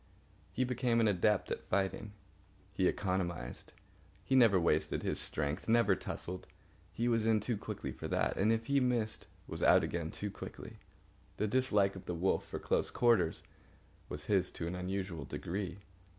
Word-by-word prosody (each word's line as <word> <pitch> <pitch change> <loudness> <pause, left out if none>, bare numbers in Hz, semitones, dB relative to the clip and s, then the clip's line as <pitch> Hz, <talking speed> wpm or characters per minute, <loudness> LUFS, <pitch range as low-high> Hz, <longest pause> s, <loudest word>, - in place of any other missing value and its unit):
He 130 - 0
became 125 -2 +1
an 115 - +4
adept 105 +1 +2
at - - -2
fighting. 100 +2 -1 0.6
He - - +2
economised. 85 -9 -2 0.5
He 135 - +2
never 115 -7 +6
wasted 80 -2 +1
his - - -1
strength, 75 +8 -2
never 115 -4 +5
tussled. 90 0 -5 0.4
He 120 - -1
was 115 -2 +2
in 110 -1 +4
too 115 +3 -1
quickly 105 - -5
for - - -6
that, - - 0
and, 105 +3 +3
if 115 0 0
he 140 +2 +3
missed, 120 -4 0 0.2
was - - -4
out - - +6
again 85 -2 -2
too 105 +3 -4
quickly. - - -9 0.6
The - - +1
dislike 105 -4 +2
of 95 - -9
the 90 - -2
wolf 90 +3 +1
for - - -5
close - - 0
quarters 110 -9 +2 0.7
was 75 0 -5
his 95 +2 +2
to 85 - -4
an 85 - -3
unusual 90 -3 -3
degree. 95 +6 -4
100 Hz, 165 wpm, -34 LUFS, 90-115 Hz, 0.7 s, never